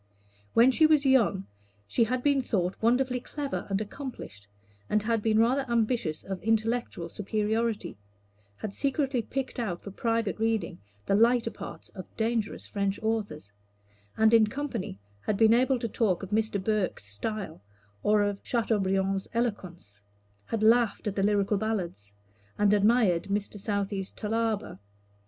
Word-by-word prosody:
When 240 +3 +7
she 310 +5 +5
was 305 -2 +3
young 230 -8 +3 0.4
she 225 - +2
had 250 +2 -2
been 285 -2 +3
thought 185 -7 -1
wonderfully 250 +2 +2
clever 280 +2 -5
and 195 0 0
accomplished, 215 - -7 0.4
and 210 -1 +1
had 225 0 0
been 215 0 +2
rather 250 +5 +3
ambitious 225 -9 0
of 190 -1 -5
intellectual 225 -4 0
superiority 215 - -2 0.6
had 210 - -5
secretly 275 -1 0
picked 260 +3 -4
out 190 -7 -2
for 200 - -9
private 230 0 -1
reading 220 -5 -1 0.3
the 195 - +2
higher 230 +1 +3
parts - - -9
of 185 - -9
dangerous 225 -1 -1
French 200 -1 -2
authors 210 - -2 0.7
and 220 +1 +4
in 225 -2 +6
company 265 - -4 0.3
had 210 - +1
been 225 +1 +6
able 255 +2 +3
to 235 - -3
talk 205 -4 0
of 195 - -7
Mr. 220 -1 +1
Burke's 200 - -1
style, 140 - -5 0.4
or 210 0 +3
of 205 -1 -1
Chateaubriand's 195 -4 0
eloquence 180 - -3 0.5
had 225 -1 -2
laughed 230 -1 +3
at 205 -2 -2
the 195 - 0
Lyrical 205 0 +2
Ballads, 175 - -3 0.4
and 205 0 +4
admired 205 -4 +3
Mr. 205 +1 -3
Southey's 200 -1 -2
Thalaba. 220 - -2
215 Hz, 145 wpm, -28 LUFS, 195-235 Hz, 0.7 s, When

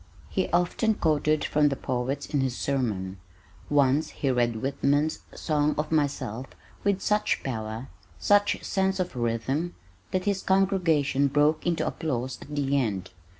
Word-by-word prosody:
He 190 - 0
often 180 +5 +2
quoted 155 -2 +1
from 150 0 +3
the 135 - -1
poets 130 +2 -2
in 145 - 0
his 130 -2 -1
sermon. 105 -9 -1 0.5
Once 145 +1 +3
he 135 - -1
read 120 -2 +1
Whitman's 140 +5 0 0.2
"Song 150 -1 +1
of 150 +1 -2
Myself" 135 -5 -1 0.4
with 200 -1 +1
such 210 0 +1
power, 110 -1 -4 0.3
such 205 0 +3
sense 190 0 0
of 180 -6 -2
rhythm 125 +8 -1 0.3
that 185 -1 -1
his 200 -2 0
congregation 170 -8 +2
broke 150 +3 +2
into 165 -2 +1
applause 130 -5 -3
at 150 - -8
the 140 -1 +1
end. 105 -7 -2
145 Hz, 145 wpm, -27 LUFS, 130-170 Hz, 0.5 s, from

